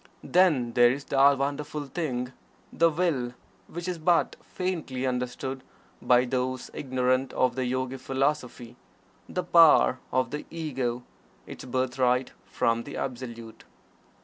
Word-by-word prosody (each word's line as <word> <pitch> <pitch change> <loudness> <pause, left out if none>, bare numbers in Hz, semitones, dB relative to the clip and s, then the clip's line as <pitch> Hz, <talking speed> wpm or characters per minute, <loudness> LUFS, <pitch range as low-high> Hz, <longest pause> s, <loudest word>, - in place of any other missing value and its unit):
Then 150 -11 +3
there 120 0 +6
is 135 +3 -2
that 140 0 +4
wonderful 145 +2 -3
thing, 130 -4 -3 0.4
the 165 - +4
Will, 150 -7 -1 0.3
which 175 +2 -7
is 180 -2 -3
but 170 +2 +2
faintly 160 -8 -4
understood 130 +1 -3 0.4
by 125 0 +4
those 130 0 -2
ignorant 130 0 0
of 130 -2 +2
the 130 -1 -1
Yogi 130 +1 -2
Philosophy 130 -3 -2 0.5
the 180 - -2
Power 165 -6 +6
of 130 -1 0
the 150 0 -5
Ego 130 -7 -3 0.4
its - - -9
birthright 125 0 0 0.2
from 115 -2 0
the 140 - -8
Absolute. 120 -3 -6
130 Hz, 125 wpm, -27 LUFS, 125-150 Hz, 0.5 s, there